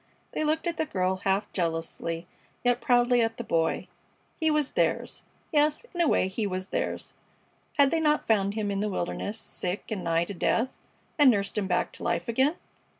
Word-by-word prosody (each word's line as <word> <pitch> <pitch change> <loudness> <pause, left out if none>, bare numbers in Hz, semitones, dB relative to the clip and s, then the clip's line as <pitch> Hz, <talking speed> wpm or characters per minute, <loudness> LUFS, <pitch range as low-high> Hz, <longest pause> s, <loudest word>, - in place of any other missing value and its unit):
They - - -1
looked 310 +2 +1
at 340 -1 -1
the 315 - 0
girl 185 -4 0
half 195 +2 0
jealously, 165 -1 -2 0.4
yet 245 0 +2
proudly 245 0 +4
at 225 0 0
the 235 - -4
Boy. 165 -6 0 0.5
He 320 - +3
was 300 -2 +1
theirs - - 0 0.3
yes, 300 +6 +2
in 350 - 0
a 335 - +4
way 185 - +3
he 205 +3 -2
was 185 0 -4
theirs - - -3 0.6
had 280 -2 +6
they 330 - +2
not 300 -1 +2
found 200 -2 +2
him 210 -2 -1
in 195 - -1
the 210 +1 0
wilderness, 200 +3 -3
sick 185 -2 -4
and 200 -4 -2
nigh 165 0 +2
to 200 - -6
death, 230 +7 +1 0.5
and 290 -3 +8
nursed 200 -4 +1
him 205 -3 0
back 180 -1 +1
to - - -9
life 170 - 0
again? 265 +7 +2
215 Hz, 195 wpm, -28 LUFS, 185-280 Hz, 0.6 s, and